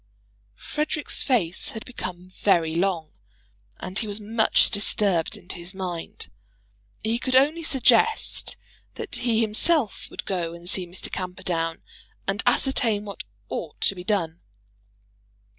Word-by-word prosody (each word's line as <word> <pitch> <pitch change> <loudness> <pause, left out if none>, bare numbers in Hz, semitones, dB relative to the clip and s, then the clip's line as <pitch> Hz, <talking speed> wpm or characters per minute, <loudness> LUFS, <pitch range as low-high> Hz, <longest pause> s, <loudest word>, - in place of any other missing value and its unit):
Frederic's 300 -1 -2
face 195 - +1
had 220 - -7
become 185 -7 -6
very 170 -5 +2
long, 170 -2 0 0.7
and 185 +2 -3
he 220 - -2
was 205 +1 -2
much 220 +1 +3
disturbed 200 -5 +2
in 175 - -17
his 175 +1 -6
mind. 180 -3 -5 0.7
He 225 +2 +1
could 255 0 0
only 295 +6 +5
suggest 285 - +3 0.4
that - - -6
he 230 -2 +2
himself 225 - +2
would - - -6
go 170 -3 -2
and 170 +1 -10
see 180 0 +1
Mr. 175 +2 -4
Camperdown, 180 -3 -2 0.4
and 195 +1 0
ascertain 235 -5 +3
what 200 -1 -6 0.3
ought 155 +7 -5
to - - +3
be 180 -2 -8
done. 175 -5 0
195 Hz, 130 wpm, -25 LUFS, 175-230 Hz, 0.7 s, only